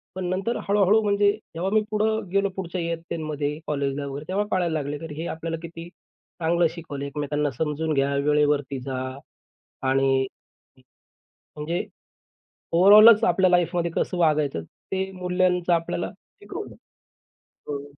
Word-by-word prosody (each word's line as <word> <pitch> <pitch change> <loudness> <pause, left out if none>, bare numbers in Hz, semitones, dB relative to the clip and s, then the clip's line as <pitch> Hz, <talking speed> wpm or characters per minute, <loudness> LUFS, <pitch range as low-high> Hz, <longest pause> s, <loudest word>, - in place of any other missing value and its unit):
पण 185 -1 -3
नंतर 195 +6 -1
हळू-हळू 205 +1 +4
म्हणजे 205 0 +3 0.2
जेव्हा 180 +3 -1
मी 215 - +5
पुढं 220 0 0
गेलो 200 0 +2
पुढच्या 180 -1 -4
इयत्तेनमध्ये 155 -3 -3
कॉलेजला 140 -1 -1
वगैरे 140 +2 -6
तेव्हा 200 +3 0
कळायला 175 -3 +1
लागले, 145 -1 -2
की 150 - -8
हे 170 - -3
आपल्याला 165 0 -4
किती 170 0 -8
चांगलं 170 -1 -2
शिकवलं. 145 -5 -6
एकमेकांना 145 0 -2
समजून 155 +4 -2
घ्या. 140 0 +1
वेळेवरती 145 -2 +2
जा. 130 0 -4 0.9
आणि 135 0 +2 1.3
म्हणजे 160 +4 -2 0.9
ओव्हरऑलच 210 +6 +8
आपल्या 185 0 +3
लाईफमध्ये 175 -1 +2
कसं 180 - 0
वागायचं 150 - +2
ते 190 - -5
मूल्यांचं 180 -1 +1
आपल्याला 165 -1 -1 0.3
शिकवलं. - - -7 1.0
हं. 145 -1 -4
165 Hz, 125 wpm, -24 LUFS, 145-185 Hz, 1.3 s, ओव्हरऑलच